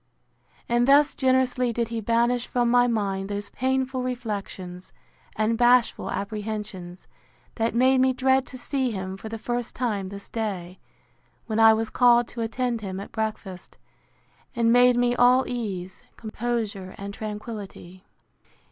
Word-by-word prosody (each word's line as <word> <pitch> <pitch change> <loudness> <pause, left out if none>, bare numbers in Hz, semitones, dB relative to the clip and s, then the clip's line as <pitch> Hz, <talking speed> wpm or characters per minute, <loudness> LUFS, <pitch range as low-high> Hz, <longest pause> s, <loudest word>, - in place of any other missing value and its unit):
And 240 +1 +2
thus 285 +1 +5
generously 260 -2 +1
did 235 0 -2
he 230 -1 -3
banish 235 +2 +1
from 240 -1 +1
my 245 0 +5
mind 200 -4 -1
those 205 0 -4
painful 260 0 -1
reflections, 200 -7 -5 0.4
and 220 +1 0
bashful 245 0 +3
apprehensions, 205 -4 -5 0.5
that 225 0 -1
made 260 +2 +4
me 260 0 +4
dread 265 +1 +2
to 255 - -9
see 260 0 -1
him 190 -3 -4
for 220 +3 -8
the 225 - -5
first 240 +2 -3
time 210 -6 -2
this 200 0 -9
day, 190 -5 -4 0.7
when 220 -1 -2
I 225 0 +8
was 225 0 -3
called 240 -1 +4
to 235 - -6
attend 235 +1 -2
him 190 -2 -5
at 200 - -8
breakfast; 215 -4 -5 0.8
and 230 -1 +3
made 245 0 +5
me 245 0 +2
all 250 +1 +4
ease, 195 -7 -5 0.2
composure, 220 -4 -4
and 200 0 -7
tranquillity. 210 -4 -8
230 Hz, 145 wpm, -25 LUFS, 200-245 Hz, 0.8 s, I